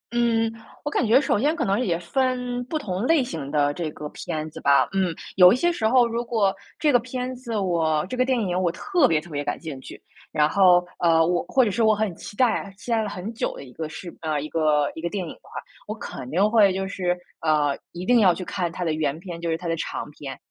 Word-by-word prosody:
嗯， 230 -1 +2 0.3
我 295 - -3
感 250 - +1
觉 245 +5 +5
首 265 - +1
先 295 +7 +2
可 335 - -1
能 195 +2 +1
也 180 -9 0
分 250 +6 -1
不 310 +5 -2
同 205 -5 -3
类 320 -3 +4
型 160 - -5
的 145 -1 +1
这 165 0 -3
个 150 0 -7
片 155 +1 -5
子 - - -10
吧， 140 0 +4
嗯。 190 -3 0 0.2
有 180 -1 +9
一 - - +3
些 345 +7 +2
时 225 -10 0
候 245 +1 +5
如 235 +1 -2
果 215 -5 +1 0.2
这 300 - +2
个 245 - +5
片 255 +1 -4
子 245 -2 -6
我 165 -5 +1
这 255 - -4
个 255 - +3
电 260 -1 +1
影 185 -3 -1
我 180 - +2
特 350 - +2
别 155 -2 +1
特 175 - -14
别 145 -2 -3
感 145 - -2
兴 155 -5 -6
趣， - - -11 0.3
然 150 0 +3
后， 180 -1 +5
呃， 165 -1 +4
我 175 +1 +1
或 260 - +3
者 220 - +1
是 230 - -1
我 220 -1 +5
很 210 -3 -1
期 185 - -10
待， 225 -4 +1
期 230 +3 -7
待 225 -1 +3
了 215 - -2
很 200 +3 -6
久 235 +3 -2
的 - - -9
一 130 - -13
个 160 +4 -5
事 170 +2 -9
呃， 155 -2 -1
一 155 - -6
个 155 -3 +2
一 160 - -7
个 170 - -2
电 195 0 -3
影 160 - -7
的 - - -20
话。 - - -18 0.4
我 215 - -4
肯 130 - -8
定 195 +8 +2
会 205 -4 +5
就 190 +1 -2
是， 180 -2 -1 0.2
呃， 150 -3 +1 0.2
一 175 +1 -6
定 245 +3 +5
要 190 -5 +5
去 185 - -6
看 180 -1 -2
它 180 +2 -5
的 165 - 0
原 155 -2 -1
篇， 170 -1 -8
就 170 0 -3
是 160 - 0
它 175 - -11
的 165 - 0
长 150 - -5
篇， 140 -2 -8
185 Hz, 280 characters per minute, -24 LUFS, 160-235 Hz, 0.4 s, 有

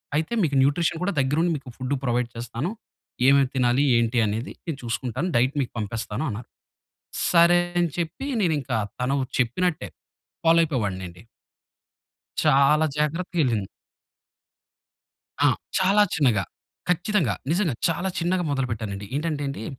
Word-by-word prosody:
అయితే 155 +8 -1
మీకు 145 -4 0
న్యూట్రిషన్ 160 +4 +1
కూడా 200 +1 0
దగ్గరండి 150 +6 +2
మీకు 135 -2 -11
ఫుడ్ 130 +1 -3
ప్రొవైడ్ 120 -1 0
చేస్తాను. 120 - -4 0.6
ఏమేమి 140 0 +5
తినాలి 125 +1 +3
ఏంటి 115 +1 +1
అనేది 110 +6 -3
నేను 165 -5 -3
చూసుకుంటాను 125 +7 -2
డైట్ 130 +4 +2
మీకు 130 - -3
పంపిస్తాను 110 +3 -3
అన్నారు. 115 +1 -6 0.8
సరే! 170 0 +6 0.2
అని 170 -1 +1
చెప్పి 170 +10 -3 0.2
నేను 170 -4 +2
ఇంకా 125 -3 -2 0.2
తను 130 +3 +1 0.2
చెప్పినట్టే 150 +7 0 0.6
ఫాలోయిపోయేవాడినండి. 105 - +1 1.2
చాలా 150 +1 +4
జాగ్రత్తగెళ్ళింది. 150 - 0 1.8
ఆ! - - +6 0.3
చాలా 195 +3 +4
చిన్నగా, 125 -11 +2 0.5
ఖచ్చితంగా 180 - +1 0.2
నిజంగా 170 - +1
చాలా 175 +3 -1
చిన్నగా 180 +1 0
మొదలు 135 -2 0
పెట్టానండి. 105 -2 -4
ఏంటంటేండి 145 -5 -3
140 Hz, 120 wpm, -24 LUFS, 120-165 Hz, 1.8 s, సరే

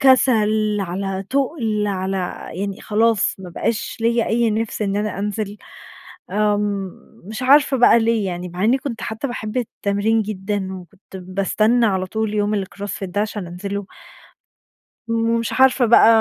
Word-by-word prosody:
كسل، 220 -6 +4
على 195 +1 -3
تقل 250 -6 0
على 190 -1 -2 0.4
يعني 195 +2 -4
خلاص 220 0 +2
ما 185 -2 -9
بقاش 210 +5 -2
ليَّ 230 0 +2
أي 230 0 +2
نِفس 220 0 -2
إن 200 -1 -1
أنا 205 -2 -2
أنزل، 205 0 -3 0.7
آمم 205 -1 0 0.3
مش 220 +5 -6
عارفة 275 +1 +5
بقى 240 -1 +6
ليه 225 -2 +1
يعني، 180 0 -4
مع 180 +3 -3
إني 245 +5 +4
كنت 255 -4 -5
حتى 220 +5 -3
باحب 230 -3 -5
التمرين 220 -2 0
جدًا، 200 -1 -3
وكنت 190 +1 -12
باستنى 200 +6 +1
على 190 -3 0
طول 220 +2 -2
يوم 205 -1 0
الcross 200 +2 -8
fit - - -3
ده 190 +3 -2
عشان 210 -3 -3
أنزله 200 +3 -5 1.2
ومش 230 0 0
عارفة 265 -1 +4
بقى 230 -1 +7
210 Hz, 150 wpm, -21 LUFS, 195-230 Hz, 1.2 s, بقى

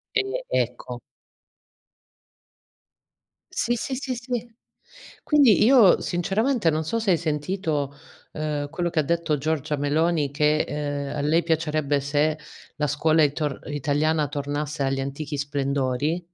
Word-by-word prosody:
Eh 440 +4 -1
ecco. - - -2 2.5
Sì, 240 - 0
sì, 260 +3 -3
sì, 260 -1 -3
sì. 240 -1 -4 0.8
Quindi 275 -9 +5
io 235 -7 +6
sinceramente 195 +3 +1
non 155 +1 -1
so 230 +9 -1
se 220 -3 0
hai - - +4
sentito, 155 -2 -2 0.4
uhm, 150 -2 -2
quello 175 -1 -2
che 155 -3 +1
detto 165 -1 0
Giorgia 150 0 -1
Meloni 150 +1 +1
che, 150 +1 +2
ehm, 145 -1 -3
a - - -2
lei 160 +4 +2
piacerebbe 155 -3 0
se 150 +2 0 0.4
la 150 - 0
scuola 155 +2 +2
itor 145 0 -2
italiana 150 +1 0
tornasse 145 +1 -3
agli 135 0 0
antichi 140 +2 -4
splendori. 140 +3 -1
155 Hz, 125 wpm, -24 LUFS, 145-175 Hz, 2.5 s, io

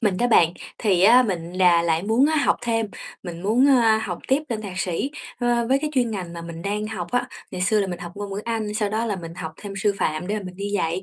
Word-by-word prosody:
Mình 205 -6 +1
đó 245 - +2
bạn, 170 -8 +5 0.3
thì 190 -5 +2
á 240 +6 +8
mình 175 -7 -3
là 180 -2 +4
lại 165 0 +1
muốn 225 +7 +3
á 315 +1 +1
học 290 - +3
thêm, 225 -2 0 0.4
mình 175 -2 -7
muốn, 230 +7 +3
a, 230 -5 +5
học 185 -5 -4
tiếp 270 +3 +3
lên 225 -3 -3
thạc 190 -3 -6
sĩ, 180 +9 -1 0.3
ơ, 240 -1 +1
với 270 +1 +4
cái 305 +1 -3
chuyên 245 -3 +2
ngành 185 -5 -5
mà 170 -1 -7
mình 165 0 -8
đang 210 +1 -2
học 195 -6 -4
á. 245 0 +1 0.2
Ngày 180 - -5
xưa 210 +2 +3
là 195 - 0
mình 175 -2 -5
học 175 0 -8
ngôn 205 0 -6
ngữ 200 - -3
Anh, 220 -2 -2
sau 210 -1 0
đó 220 +3 -1
là 210 -3 -1
mình 165 -2 -8
học 165 -3 -6
thêm 205 -2 -8
sư 205 +1 +2
phạm 155 +3 -1
để 210 +2 -1
mà - - -7
mình 180 0 -8
đi 200 +1 -4
dạy, 175 -1 0
205 Hz, 280 wpm, -23 LUFS, 180-230 Hz, 0.4 s, á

